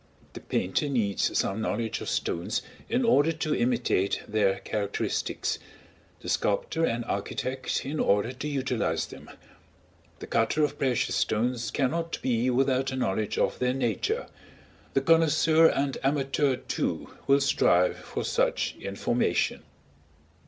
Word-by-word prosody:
The - - -7
painter 120 +11 -1
needs 110 -7 0
some 100 +3 0
knowledge 110 +1 -2
of - - -4
stones 85 - -1 0.3
in 245 +1 +1
order 165 -9 +4
to 155 -1 -1
imitate 120 -5 +1
their 105 -2 +2
characteristics; 100 -1 -2 0.6
the - - -9
sculptor 105 +10 0
and 120 -5 0
architect, 130 +2 -3
in 150 +3 -3
order 105 +4 +2
to 130 +3 -6
utilize 125 - -1
them; - - -12 0.9
the - - -8
cutter 115 +7 +1
of 145 0 -1
precious 130 -4 +1
stones 120 +1 0
cannot 165 +5 -1
be 125 0 +1
without 130 +1 +1
a - - -3
knowledge 105 -4 -1
of - - 0
their 125 0 +1
nature; 120 -7 -1 0.7
the 135 - +4
connoisseur 160 +1 +5
and 135 -1 -1
amateur, 135 0 +1
too, - - -3
will 140 +1 +5
strive 90 -9 +3
for - - -5
such - - 0
information. 100 +5 0
130 Hz, 130 wpm, -27 LUFS, 110-140 Hz, 0.9 s, connoisseur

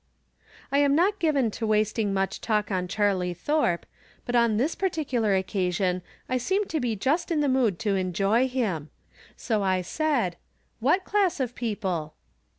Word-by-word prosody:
I 280 - +3
am 285 -1 +4
not 390 +6 +2
given 280 -8 +2
to 225 +1 -3
"wasting 215 0 +1
much 195 0 -1
talk 210 -2 0
on 180 -1 -1
Charlie 190 -3 0
Thorpe, 180 - 0 0.4
but 245 - -2
on 235 -3 +3
this 280 +8 +1
particular 265 - 0
occasion 185 -1 0 0.3
I 255 - 0
seemed 385 - 0
to 315 - -1
be 240 -4 -1
just 285 - 0
in 320 -3 +1
the 290 - +2
mood 255 -8 +2
to 205 -3 +1
enjoy 195 +6 +1
him. 205 - -2 0.5
So 220 -4 -1
I 185 -2 +1
said: 245 - 0 0.2
" - - -42
What 305 - +2
class 395 -6 +1
of 250 -2 -1
people 195 -10 -3
225 Hz, 165 wpm, -26 LUFS, 190-280 Hz, 0.5 s, am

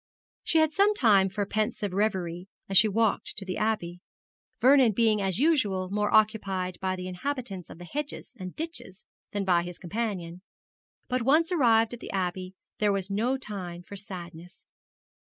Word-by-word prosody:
She 325 - +2
had 315 -1 +4
some 400 +5 +3
time 200 - +4
for 200 +2 -2
pensive 210 -1 -2
reverie, 185 -3 -1 0.2
as 195 - -3
she 215 - +8
walked 220 +1 0
to 195 - -3
the 185 - -4
Abbey, 195 -5 -1 0.6
Vernon 260 -3 +6
being 215 -1 +2
as 190 -2 -1
usual 210 - +1
more 210 0 0
occupied 195 -4 +1
by 190 -1 0
the 185 0 -6
inhabitants 200 - -5
of - - -10
the 175 - -10
hedges 290 +7 -5
and 185 -1 -7
ditches 315 - -7 0.3
than 205 -1 -2
by 175 -2 +3
his 175 0 -7
companion; 185 -3 -4 0.7
but 255 0 0
once 310 +8 +3
arrived 230 -8 +3
at 240 - -7
the - - -8
Abbey, 185 0 -3 0.2
there 210 -1 +3
was 195 0 -2
no 235 +7 +1
time 185 -8 -7
for 200 - -10
sadness. 180 -3 -10
200 Hz, 170 wpm, -27 LUFS, 185-230 Hz, 0.7 s, she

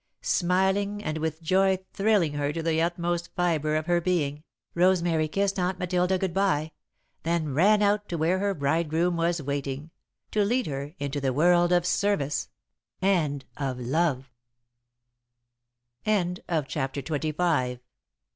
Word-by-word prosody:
Smiling 190 +3 +1
and 155 +1 -2
with 160 +1 -3
joy 190 +3 +3 0.2
thrilling 195 -7 +2
her 145 0 -1
to 165 +2 -4
the 160 0 +1
utmost 175 0 -1
fibre 155 -4 +1
of 155 0 -1
her 175 0 +2
being, 155 -5 -1 0.3
Rosemary 170 -3 +2
kissed 195 +4 0
Aunt 180 +1 0
Matilda 180 +1 +1
good 185 -2 -2
bye, 160 -6 +1 0.5
then 160 -3 -1
ran 205 +8 +4
out 205 0 +1
to 170 - -2
where 170 +4 +1
her 200 0 0
bridegroom 160 +4 +1
was 170 -1 0
waiting, 140 +2 -4 0.4
to 210 - +2
lead 245 +5 +1
her 140 +2 -5
into 145 0 -3
the 135 -1 0
world 175 +4 +4
of 175 -1 +3
service 180 -7 0 0.5
and 155 -8 +1
of 135 -3 -3
love. 135 0 0
170 Hz, 130 wpm, -27 LUFS, 150-185 Hz, 0.5 s, ran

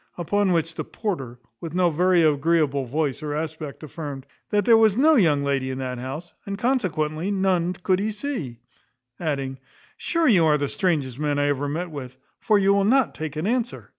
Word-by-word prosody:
Upon 195 +3 +1
which 165 -1 0
the - - -4
porter, 135 - -4 0.2
with 165 0 -7
no 180 -2 +3
very 175 +2 +3
agreeable 150 -2 +2
voice 145 +2 -2
or 150 -1 -3
aspect, 155 -1 -5
affirmed, 145 -3 -7 0.2
"that 205 -2 +1
there 230 - +7
was 220 -2 +4
no 310 +5 +5
young 160 - +3
lady 135 -2 0
in 130 - -4
that 130 -2 -4
house, 145 +7 -7
and 200 0 -5
consequently 180 - -1
none 190 -3 +1
could 185 +1 0
he 210 +2 -1
see;" 205 - -5 0.6
adding, 135 -5 -3 0.4
"sure 335 -2 0
you 190 -10 +5
are 150 -1 +4
the 145 -1 -2
strangest 145 - -1
man 145 -1 0
I 145 0 +2
ever 145 0 -1
met 170 +4 -3
with, 130 -3 -8 0.2
for 215 - +3
you 200 0 +4
will 200 0 +3
not 255 +5 +3
take 155 -2 -6
an 155 +3 -3
answer." 240 +2 -2
160 Hz, 195 wpm, -24 LUFS, 145-195 Hz, 0.6 s, there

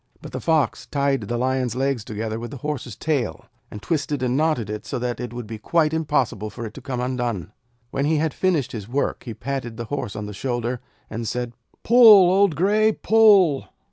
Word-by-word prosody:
But - - -10
the - - -5
Fox 160 -3 +1
tied 140 -3 0
the 120 - -2
Lion's 130 -1 0
legs 135 -3 -1
together 110 +1 -4
with 120 0 -6
the 140 - -8
Horse's 135 -7 -4
tail, 130 - -2 0.2
and 105 - -9
twisted 145 -4 -1
and 125 0 0
knotted 150 -7 +1
it 105 0 -5
so 120 - -4
that 125 0 -3
it 120 -2 -5
would 120 -1 -6
be 110 0 -7
quite 160 +5 +1
impossible 130 -9 0
for 115 - -7
it 110 - -7
to 135 - -10
come 130 -1 -4
undone. 120 -8 -2 0.4
When 140 - -1
he 155 +2 +2
had 155 0 0
finished 175 -8 0
his 105 -2 -7
work 135 +1 -2
he 115 -3 -6
patted 125 -3 -5
the 120 - -4
Horse 120 -8 -3
on 105 - -4
the 105 - -7
shoulder, 120 +2 -2 0.3
and 115 +1 -5
said: 120 0 -3 0.3
'Pull, 215 -6 +8
old 195 -3 +3
Grey! 215 +5 +3
Pull!' 205 -12 +4
130 Hz, 205 wpm, -23 LUFS, 115-155 Hz, 0.4 s, Pull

